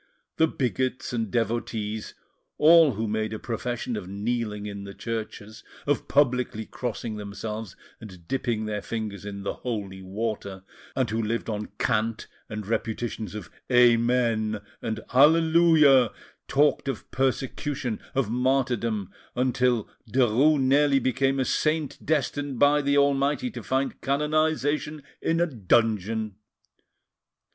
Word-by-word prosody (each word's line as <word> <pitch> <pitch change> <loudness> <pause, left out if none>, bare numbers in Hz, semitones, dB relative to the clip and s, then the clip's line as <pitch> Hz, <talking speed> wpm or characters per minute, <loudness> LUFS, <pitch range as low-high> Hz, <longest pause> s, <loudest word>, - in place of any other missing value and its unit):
The 160 - +4
bigots 130 -3 -2
and 115 -3 -1
devotees, 110 -1 -2 0.4
all 160 -2 +7
who 110 +2 -2
made 110 +1 -1
a - - -3
profession 120 +1 -3
of 100 -4 -5
kneeling 105 +1 -3
in 100 -1 -6
the 100 0 -9
churches, 110 -1 -6 0.2
of 145 0 0
publicly 125 -5 +1
crossing 115 -2 -4
themselves 105 0 -6 0.2
and 95 -6 -12
dipping 120 -5 -1
their 105 -1 -3
fingers 105 -3 -5
in 100 -1 -6
the - - -2
holy 100 -6 -5
water, 100 -1 -4 0.3
and 130 -2 +1
who 110 +1 -1
lived 115 +1 -2
on 105 0 -3
cant 115 -1 0 0.2
and 110 -2 -5
repetitions 110 -1 -3
of 105 -5 -7 0.2
"Amen" 120 -3 +3 0.2
and 110 -1 -3
"Alleluia," 155 -3 +6 0.4
talked 145 0 +2
of 135 -5 -4
persecution, 130 -1 -1 0.2
of 135 -4 +1
martyrdom, 120 -4 0 0.2
until 125 -2 +1 0.2
Derues 130 +5 +4
nearly 140 +1 +4
became 135 +1 +1
a 130 - +1
saint 155 0 -1
destined 145 -2 -1
by 145 +3 +4
the 140 0 +2
Almighty 140 - +2
to - - -7
find 135 +1 -1
canonisation 150 0 0 0.2
in 165 0 +1
a 170 - +4
dungeon. 110 - 0
120 Hz, 125 wpm, -26 LUFS, 110-135 Hz, 0.4 s, all